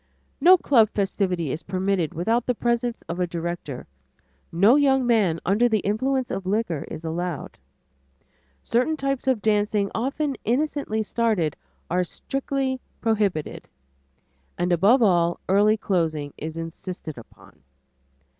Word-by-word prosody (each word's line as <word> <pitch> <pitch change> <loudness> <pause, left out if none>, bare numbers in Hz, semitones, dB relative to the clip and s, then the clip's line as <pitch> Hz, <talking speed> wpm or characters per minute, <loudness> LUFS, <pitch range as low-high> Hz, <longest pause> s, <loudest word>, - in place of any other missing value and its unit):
No 365 +5 +8
club 235 - +4
festivity 185 -7 -1
is 155 - -4
permitted 185 -3 -1
without 225 +8 0
the 250 - +1
presence 235 0 -1
of 170 +2 -4
a 180 - +1
director; 170 -5 -5 0.7
no 200 +9 +5
young 270 -3 +3
man 210 -9 +2
under 220 +6 +3
the 215 -3 +1
influence 260 +5 -1
of 190 -1 -4
liquor 195 -7 -1
is 160 +1 -7
allowed; 170 -1 -4 1.0
certain 255 +7 +1
types 275 -2 -2
of 255 -6 +1
dancing 210 -1 +1
often 275 +3 -2
innocently 250 -3 0
started 215 -9 0 0.3
are 180 +1 +1
strictly 270 +6 -3 0.2
prohibited; 205 -8 -1 0.9
and 175 +1 0
above 205 +9 +4
all, 175 -4 +3
early 205 +3 +4
closing 160 -8 -1
is 160 +2 -6
insisted 165 -1 -6
upon. 115 - -16
205 Hz, 125 wpm, -24 LUFS, 175-240 Hz, 1.0 s, No